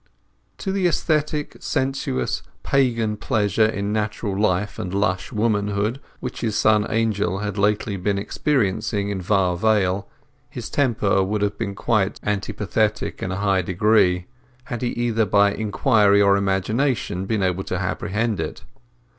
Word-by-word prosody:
To 195 - -3
the 190 -2 +2
aesthetic, 150 -3 0
sensuous, 130 - -1 0.2
pagan 115 -5 +1
pleasure 105 +1 +2
in 100 -1 -2
natural 105 -1 -2
life 100 0 0
and 90 - -4
lush 95 -1 -1
womanhood 105 +1 0 0.2
which 125 - -6
his 110 -3 -1
son 105 -1 +3
Angel 105 -5 0
had 105 -1 -3
lately 105 0 +1
been 100 +2 0
experiencing 100 -3 0
in 100 -2 -3
Var 90 -1 +2
Vale, 100 -1 +1 0.4
his - - -7
temper 110 -8 +2
would 105 +2 -1
have 100 0 0
been 100 -4 -3 0.5
antipathetic 105 +1 -1
in 95 - -2
a 95 - -3
high 95 -2 +3
degree, 90 -1 +2 0.4
had 120 -2 -5
he 125 - 0
either 115 -2 0
by 100 +1 +4
inquiry 105 -1 +3
or 100 -1 +5
imagination 100 +1 0
been 105 -2 0
able 95 0 0
to - - -2
apprehend 110 +2 -1
it. - - -5
105 Hz, 140 wpm, -22 LUFS, 100-115 Hz, 0.5 s, or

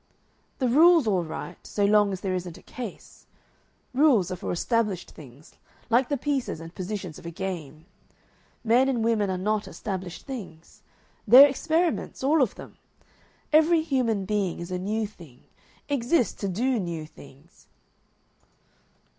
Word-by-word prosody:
"The 260 - 0
rule's 320 +4 +6
all 190 -5 +1
right, 165 +2 -7
so 205 - -1
long 205 0 +4
as 190 -1 -5
there 190 -2 -2
isn't 180 -2 -5
a - - -16
case. 240 -6 -9 0.7
Rules 255 - +3
are - - -2
for 180 - -5
established 210 0 -1
things, 140 0 -15 0.4
like 240 +2 +3
the 285 - 0
pieces 270 - -2
and 165 +1 -10
positions 185 -3 -6
of - - -16
a - - -3
game. 170 -4 -6 0.8
Men 245 +4 +3
and 240 -4 0
women 220 -3 +1
are 185 - -1
not 210 +3 -1
established 185 -4 -6
things; 195 - -9 0.5
they're 260 +6 +10
experiments, 315 +2 -1
all 295 +3 +3
of 250 - +1
them. - - -12 0.7
Every 320 +1 +5
human 245 -10 0
being 200 -3 -1
is 170 +1 -7
a 180 - -2
new 215 +4 -1
thing, 170 - -14 0.4
exists 270 -1 +1
to 200 - -1
do 235 +6 0
new 170 -4 -4
things. 145 +1 -18
210 Hz, 150 wpm, -26 LUFS, 180-255 Hz, 0.8 s, they're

